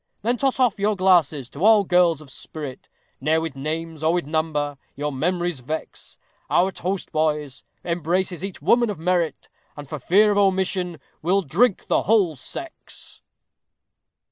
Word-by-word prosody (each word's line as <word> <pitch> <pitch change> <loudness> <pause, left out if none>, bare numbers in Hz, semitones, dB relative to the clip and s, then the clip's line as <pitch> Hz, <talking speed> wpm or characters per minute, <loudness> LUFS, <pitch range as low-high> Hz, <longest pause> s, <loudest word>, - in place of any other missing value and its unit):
Then 240 +3 +1
toss 265 +1 0
off 245 -6 +2
your 210 +1 +1
glasses 170 -8 +3
to 145 - -6
all 215 -1 +6
girls 175 -4 +3
of 140 -3 -13
spirit, 145 -2 -8 0.3
Ne'er 155 +3 +2
with 160 -3 -4
names, 160 +3 -4
or 160 +1 +2
with 175 -3 0
number, 150 -2 -1 0.2
your 145 +1 -2
memories 175 +2 -1
vex; 155 +6 -7 0.3
Our 185 +2 +3
toast, 185 +1 -4
boys, 150 -4 -1 0.2
embraces 175 +1 -1
each 195 -2 -6
woman 240 -1 +4
of 205 - -3
merit, 170 0 -1 0.3
And, 145 -1 -8
for 155 +1 -6
fear 205 +10 +4
of 205 - +2
omission, 185 -3 +1 0.2
we'll 190 +4 +2
drink 190 - +2
the - - +2
WHOLE 195 -7 +2
SEX. 330 - -9
170 Hz, 155 wpm, -23 LUFS, 155-195 Hz, 0.3 s, all